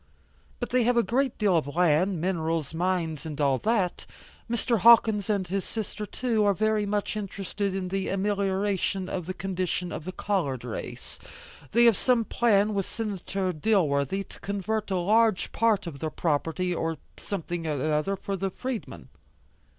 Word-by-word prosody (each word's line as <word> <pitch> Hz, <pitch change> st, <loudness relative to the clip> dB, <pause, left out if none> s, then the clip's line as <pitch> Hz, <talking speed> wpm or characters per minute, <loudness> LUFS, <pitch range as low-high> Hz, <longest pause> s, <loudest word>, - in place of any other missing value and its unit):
But 245 Hz, -, -4 dB
they 250 Hz, 0 st, +3 dB
have 245 Hz, 0 st, +3 dB
a 235 Hz, -, +5 dB
great 260 Hz, +2 st, 0 dB
deal 205 Hz, -4 st, +3 dB
of 155 Hz, -4 st, +1 dB
land, 175 Hz, +2 st, +3 dB
minerals, 165 Hz, -4 st, -1 dB
mines 165 Hz, -3 st, -1 dB
and 155 Hz, -2 st, -6 dB
all 140 Hz, -3 st, +2 dB
that. 205 Hz, -5 st, 0 dB, 0.4 s
Mr. 235 Hz, -1 st, +1 dB
Hawkins 220 Hz, -1 st, +6 dB
and 200 Hz, -3 st, +1 dB
his 190 Hz, +1 st, -2 dB
sister 215 Hz, -1 st, -5 dB
too 230 Hz, -3 st, 0 dB
are 200 Hz, -1 st, +3 dB
very 215 Hz, +1 st, +1 dB
much 205 Hz, +1 st, -1 dB
interested 200 Hz, -1 st, -3 dB
in 185 Hz, -1 st, -3 dB
the 195 Hz, 0 st, -2 dB
amelioration 195 Hz, -1 st, 0 dB
of 180 Hz, -3 st, -4 dB
the 185 Hz, -, -4 dB
condition 185 Hz, -2 st, -2 dB
of 155 Hz, -, -6 dB
the 185 Hz, -, -4 dB
colored 170 Hz, -, -1 dB
race; 120 Hz, -3 st, -7 dB, 0.5 s
they 235 Hz, +1 st, +5 dB
have 230 Hz, -5 st, +6 dB
some 245 Hz, -3 st, +2 dB
plan, 215 Hz, -3 st, +2 dB
with 195 Hz, -2 st, -1 dB
Senator 195 Hz, -3 st, -3 dB
Dilworthy, 160 Hz, -2 st, +1 dB
to -, -, -14 dB
convert 205 Hz, +2 st, -2 dB
a 190 Hz, -, 0 dB
large 215 Hz, +3 st, +2 dB
part 225 Hz, -4 st, +2 dB
of 155 Hz, -5 st, -7 dB
their 155 Hz, -, -2 dB
property 165 Hz, +3 st, -1 dB
to 165 Hz, -1 st, -2 dB, 0.2 s
something 175 Hz, -4 st, -4 dB
another 155 Hz, +5 st, 0 dB
for 195 Hz, +1 st, -4 dB
the 195 Hz, +1 st, -2 dB
freedmen." 250 Hz, +4 st, -6 dB
195 Hz, 165 wpm, -27 LUFS, 170-210 Hz, 0.5 s, Hawkins